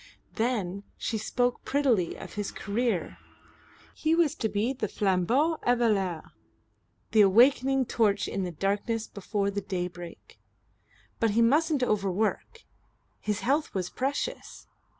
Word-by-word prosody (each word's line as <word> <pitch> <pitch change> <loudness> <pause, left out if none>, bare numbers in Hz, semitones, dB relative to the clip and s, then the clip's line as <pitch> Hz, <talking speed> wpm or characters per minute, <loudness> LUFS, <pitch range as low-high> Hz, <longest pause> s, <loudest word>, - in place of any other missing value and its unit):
Then 210 -5 -1 0.2
she 220 - -2
spoke 245 +3 -1
prettily 255 -11 +1
of - - -9
his 205 -1 -3
career. 200 - -2 0.7
He 315 +1 +1
was 330 -3 +3
to 220 - -2
be 215 +6 0
the 245 -5 -3
flambeau 220 - +1
eveilleur, 210 -9 +1 0.8
the 220 - +6
awakening 260 +6 +5
torch 210 -4 +1
in 195 - -3
the 180 - -3
darkness 205 +6 -1
before 200 0 -2
the 200 0 -3
daybreak. 175 -3 -6 0.8
But 225 - +3
he 235 - +6
musn't 295 +3 +3
overwork. 215 - -1 0.6
His 210 0 -2
health 280 +6 0
was 180 -2 -2
precious. 285 - -3
220 Hz, 125 wpm, -28 LUFS, 195-255 Hz, 0.8 s, the